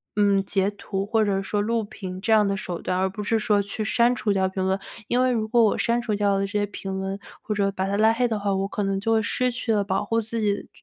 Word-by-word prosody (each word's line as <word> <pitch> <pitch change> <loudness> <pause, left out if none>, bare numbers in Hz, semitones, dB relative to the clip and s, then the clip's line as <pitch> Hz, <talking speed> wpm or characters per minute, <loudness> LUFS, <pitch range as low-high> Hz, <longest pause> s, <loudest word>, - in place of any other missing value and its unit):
嗯， 200 -1 +3
截 195 +1 +1
图 195 -1 -4
或 220 +1 +2
者 195 -1 0
说 205 +1 -1
录 230 +1 0
屏 185 -3 -7
这 225 - -1
样 210 -2 +5
的 195 - 0
手 180 -3 -5
段， 180 - -1
而 190 0 +1
不 210 +2 -6
是 225 +2 +1
说 210 -1 +2
去 200 +2 -4
删 235 +3 +3
除 215 -3 -1
掉 190 -1 +2
评 190 0 -2
论， 190 +1 +1 0.3
因 250 +1 +2
为 255 - +3
如 220 -2 -1
果 235 0 +4
我 210 - +2
删 235 +1 +1
除 225 -3 -1
掉 200 -1 +2
了 - - +1
这 195 - -1
些 205 0 0
评 195 -1 -6
论， 190 +1 -3 0.2
或 215 - -3
者 200 -1 +2
把 190 -1 -1
他 200 +1 -1
拉 220 +1 +5
黑 245 +2 +1
的 220 -3 -2
话， 200 -1 0
我 195 0 0
可 205 - -2
能 195 0 0
就 225 +2 0
会 220 - +3
失 250 +4 0
去 235 -2 -1
了 205 - +2
保 200 +1 -1
护 230 +2 +1
自 225 +1 -3
己 205 -1 -1
205 Hz, 310 characters per minute, -24 LUFS, 195-225 Hz, 0.3 s, 样